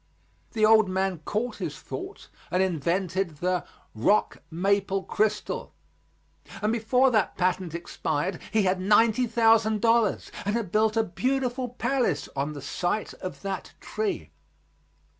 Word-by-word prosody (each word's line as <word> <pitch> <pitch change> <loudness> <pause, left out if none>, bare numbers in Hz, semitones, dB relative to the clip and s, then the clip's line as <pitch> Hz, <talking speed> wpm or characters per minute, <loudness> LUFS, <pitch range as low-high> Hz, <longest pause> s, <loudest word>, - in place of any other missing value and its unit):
The 215 -2 +3
old 220 -2 +6
man 190 -2 -1
caught 235 +4 -2
his - - -4
thought 380 +2 -8 0.2
and 180 +1 +2
invented 175 0 -1
the 180 +2 -1 0.3
"rock 130 - +1
maple 195 +3 0
crystal," 215 +1 -1 0.9
and 215 +1 0
before 250 +3 +3
that 215 -4 +1
patent 180 -2 0
expired 170 +1 -2
he 215 -2 +3
had 185 0 +1
ninety 225 +5 +4
thousand 225 -1 +3
dollars 225 -1 +2
and 205 +3 -1
had 225 -7 -2
built 220 +1 +2
a 225 - +4
beautiful 250 +6 -1
palace 245 - 0
on 140 +2 -2
the 145 -2 -8
site 180 +4 -2
of 185 +1 -8
that 195 -1 -4
tree. 430 -3 -3
205 Hz, 135 wpm, -26 LUFS, 185-225 Hz, 0.9 s, old